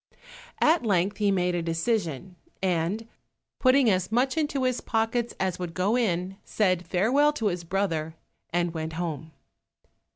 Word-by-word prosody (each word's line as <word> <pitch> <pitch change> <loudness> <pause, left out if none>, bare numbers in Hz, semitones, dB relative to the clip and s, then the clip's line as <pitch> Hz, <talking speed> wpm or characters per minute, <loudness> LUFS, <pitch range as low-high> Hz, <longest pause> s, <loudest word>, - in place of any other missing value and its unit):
At 320 -2 +4
length 200 -2 +1
he 210 -1 +2
made 180 -2 +1
a 175 - 0
decision, 170 - -2 0.3
and 185 +5 0 0.5
putting 260 0 +4
as 185 -2 +1
much 255 +3 +2
into 295 -4 0
his 255 -1 0
pockets 225 +1 -1
as 185 -1 -1
would 175 -2 -5
go 195 +5 +1
in, 190 -5 0
said 185 -4 0
farewell 250 - +3
to 225 -8 0
his 175 -2 -4
brother, 165 -3 -2 0.4
and 175 0 0
went 160 -1 -4
home. 160 -2 -4
190 Hz, 150 wpm, -26 LUFS, 170-230 Hz, 0.5 s, At